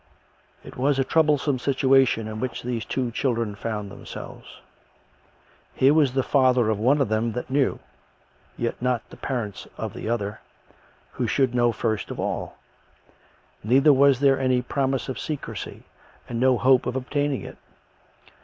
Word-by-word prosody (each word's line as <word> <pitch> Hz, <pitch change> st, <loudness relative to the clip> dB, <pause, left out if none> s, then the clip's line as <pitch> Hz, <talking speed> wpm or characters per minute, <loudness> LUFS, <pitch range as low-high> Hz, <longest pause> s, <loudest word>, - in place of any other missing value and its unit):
It -, -, -12 dB
was 135 Hz, +2 st, +1 dB
a 135 Hz, -, +3 dB
troublesome 150 Hz, -2 st, +2 dB
situation 130 Hz, -4 st, +2 dB
in 110 Hz, 0 st, -6 dB
which 130 Hz, +1 st, -4 dB
these 120 Hz, -3 st, -3 dB
two 125 Hz, -3 st, -2 dB
chil 130 Hz, 0 st, 0 dB
dren 115 Hz, -3 st, -2 dB
found 105 Hz, -1 st, -5 dB
themselves. -, -, -10 dB, 1.2 s
Here 135 Hz, +2 st, +4 dB
was 145 Hz, -5 st, +3 dB
the 135 Hz, 0 st, +1 dB
father 125 Hz, -5 st, +3 dB
of 105 Hz, -, -2 dB
one 135 Hz, +6 st, +3 dB
of 135 Hz, -, +2 dB
them 110 Hz, +2 st, 0 dB
that 125 Hz, +2 st, -5 dB
knew, 135 Hz, -1 st, +1 dB, 0.8 s
yet 120 Hz, 0 st, -3 dB
not 125 Hz, -1 st, -1 dB
the -, -, -10 dB
parents 115 Hz, -7 st, -4 dB
of -, -, -4 dB
the -, -, -5 dB
other, 105 Hz, -3 st, -2 dB, 0.7 s
who 125 Hz, -, -2 dB
should 130 Hz, +2 st, +1 dB
know 120 Hz, -1 st, +3 dB
first 110 Hz, -1 st, -2 dB
of -, -, -6 dB
all. -, -, -3 dB, 1.1 s
Neither 135 Hz, +7 st, +5 dB
was 140 Hz, -1 st, +4 dB
there 135 Hz, -2 st, +4 dB
any 130 Hz, -1 st, +1 dB
promise 135 Hz, 0 st, -1 dB
of 130 Hz, -, -4 dB
secrecy 150 Hz, -3 st, -6 dB, 0.4 s
and 115 Hz, -, -4 dB
no 130 Hz, 0 st, +4 dB
hope 130 Hz, +3 st, +3 dB
of 125 Hz, -, -2 dB
obtaining 145 Hz, +1 st, -1 dB
it. -, -, -10 dB
125 Hz, 160 wpm, -24 LUFS, 115-135 Hz, 1.2 s, Neither